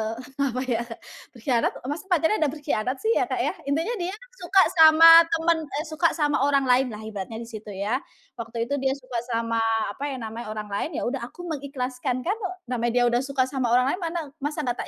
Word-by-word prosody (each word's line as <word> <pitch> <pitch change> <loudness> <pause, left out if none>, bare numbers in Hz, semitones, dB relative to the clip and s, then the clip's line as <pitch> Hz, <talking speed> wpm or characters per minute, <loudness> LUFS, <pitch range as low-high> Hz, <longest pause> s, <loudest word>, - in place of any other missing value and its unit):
eee 260 +3 -4
apa 255 0 -2
ya 245 -3 -1 0.6
berkhianat, 240 0 +1 0.2
masa 295 +3 -5
pacaran 355 +2 +2
ada 310 - +3
berkhianat 280 -4 -2
sih 445 - +2
ya, - - +1
Kak, - - -2
ya? - - +1 0.2
Intinya 325 +12 0
dia 360 +1 -3 0.3
suka 370 +2 +4 0.2
sama 320 +1 +9 0.2
teman 330 0 +2
eee, 290 +2 -3
suka 335 +2 +3
sama 295 -2 +1
orang 280 -1 +3
lain 255 0 +3
lah, 215 -3 -7
ibaratnya 220 +1 -6
di 230 - -11
situ, 215 -1 -9
ya. 210 +7 -1 0.4
Waktu 230 0 -3
itu 280 +4 -2
dia 265 0 0
suka 255 -3 -5
sama, 230 -1 -1 0.3
apa 280 +7 -5
ya 280 - -4
namanya, 225 +1 -6
orang 210 -1 -6
lain, 200 +9 -2
yaudah 265 +2 -2
aku 350 - -12
mengikhlaskan. 260 -3 -3
Kan 395 +6 -1 0.3
namanya 240 -1 -1
dia 245 - +4
udah 240 - +2
suka 270 0 0
sama 260 -1 -2
orang 250 +2 +3
lain, - - -3
mana 340 -1 -3 0.2
masa 295 +2 -3
nggak 245 -2 -3
265 Hz, 205 wpm, -25 LUFS, 235-305 Hz, 0.6 s, sama